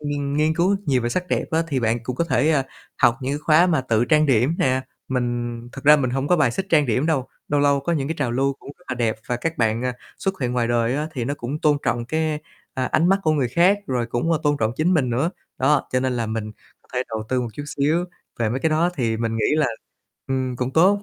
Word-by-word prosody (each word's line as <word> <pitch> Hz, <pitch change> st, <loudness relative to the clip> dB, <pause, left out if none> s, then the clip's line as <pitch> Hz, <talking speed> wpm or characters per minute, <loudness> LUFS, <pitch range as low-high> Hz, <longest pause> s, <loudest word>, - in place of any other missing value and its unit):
nghiên 145 Hz, -1 st, -2 dB
nghiên 155 Hz, +1 st, +2 dB
cứu 180 Hz, +4 st, +2 dB
nhiều 130 Hz, -4 st, +2 dB
về 120 Hz, -, 0 dB
sắc 180 Hz, +8 st, -2 dB
đẹp -, -, 0 dB
á, 165 Hz, 0 st, +2 dB
thì 135 Hz, -4 st, 0 dB
bạn 115 Hz, 0 st, +1 dB
cũng 125 Hz, +1 st, -4 dB
có 170 Hz, -, +1 dB
thể, 160 Hz, -2 st, +2 dB
ờ, 150 Hz, -4 st, +3 dB, 0.4 s
học 120 Hz, -, +5 dB
những 135 Hz, +1 st, -2 dB
cái 145 Hz, -, -2 dB
khóa 155 Hz, +3 st, +4 dB
mà 160 Hz, -6 st, +2 dB
tự 120 Hz, -3 st, +1 dB
trang 155 Hz, +4 st, +3 dB
điểm 130 Hz, +3 st, +3 dB
nè, 130 Hz, -1 st, +2 dB, 0.3 s
mình 120 Hz, -2 st, -2 dB
thật 135 Hz, -, -9 dB
ra 150 Hz, +1 st, +8 dB
mình 130 Hz, -4 st, 0 dB
hổng 135 Hz, +3 st, -1 dB
có 180 Hz, -, +4 dB
bài 145 Hz, -6 st, +3 dB
xích 190 Hz, +10 st, -3 dB
trang 150 Hz, -3 st, +4 dB
điểm 125 Hz, +5 st, +1 dB
đâu, 145 Hz, -6 st, 0 dB, 0.2 s
lâu 145 Hz, 0 st, +2 dB
lâu 140 Hz, -1 st, +3 dB
có 155 Hz, +5 st, -1 dB
những 140 Hz, -4 st, -1 dB
cái 160 Hz, -, -1 dB
trào 135 Hz, -5 st, 0 dB
lưu 135 Hz, +2 st, +1 dB
cũng -, -, -11 dB
rất 180 Hz, -, -24 dB
là 130 Hz, -, -1 dB
đẹp 115 Hz, -3 st, 0 dB
và 125 Hz, -, -1 dB
các 165 Hz, +6 st, -3 dB
bạn, 115 Hz, 0 st, +1 dB
à, 125 Hz, -, 0 dB, 0.3 s
xuất 195 Hz, -3 st, -2 dB
hiện 125 Hz, -2 st, -1 dB
ngoài 120 Hz, -2 st, 0 dB
đời 120 Hz, 0 st, +1 dB
á 150 Hz, +1 st, -2 dB
thì 125 Hz, -5 st, -3 dB
nó 140 Hz, +4 st, -2 dB
cũng 140 Hz, +2 st, -5 dB
tôn 150 Hz, -1 st, +3 dB
trọng 120 Hz, 0 st, -1 dB
cái, 155 Hz, +3 st, -1 dB, 0.3 s
ơ, 130 Hz, -1 st, -1 dB
ánh 165 Hz, +3 st, +3 dB
mắt 195 Hz, +1 st, +4 dB
của 155 Hz, -, +2 dB
người 140 Hz, -5 st, +1 dB
khác 175 Hz, -, +4 dB
rồi 125 Hz, -2 st, -1 dB
cũng, 120 Hz, +8 st, -1 dB
ơ, 160 Hz, -, +2 dB
tôn 145 Hz, -1 st, +2 dB
trọng 110 Hz, 0 st, +1 dB
chính 175 Hz, +4 st, +2 dB
mình 135 Hz, -7 st, +1 dB
nữa. 135 Hz, +8 st, 0 dB, 0.3 s
Đó, 140 Hz, +2 st, +2 dB
cho 130 Hz, -, +2 dB
nên 130 Hz, 0 st, 0 dB
là 115 Hz, -2 st, -1 dB
mình 110 Hz, -1 st, -4 dB, 0.3 s
có -, -, -30 dB
thể 125 Hz, -, +1 dB
đầu 110 Hz, -1 st, -3 dB
tư 130 Hz, -1 st, +1 dB
một 120 Hz, -, -3 dB
chút 145 Hz, -, -6 dB
xíu 150 Hz, +4 st, 0 dB, 0.3 s
về 115 Hz, -2 st, +1 dB
mấy 130 Hz, +4 st, -2 dB
cái 160 Hz, -, +1 dB
đó, 165 Hz, +3 st, +2 dB
thì 115 Hz, -6 st, 0 dB
mình 115 Hz, 0 st, -2 dB
nghĩ 110 Hz, -, 0 dB
là, 155 Hz, -, +3 dB, 0.6 s
ừm, 130 Hz, -1 st, -2 dB
cũng 125 Hz, +1 st, -2 dB
tốt. 190 Hz, +7 st, +4 dB
135 Hz, 275 wpm, -22 LUFS, 120-155 Hz, 0.6 s, ra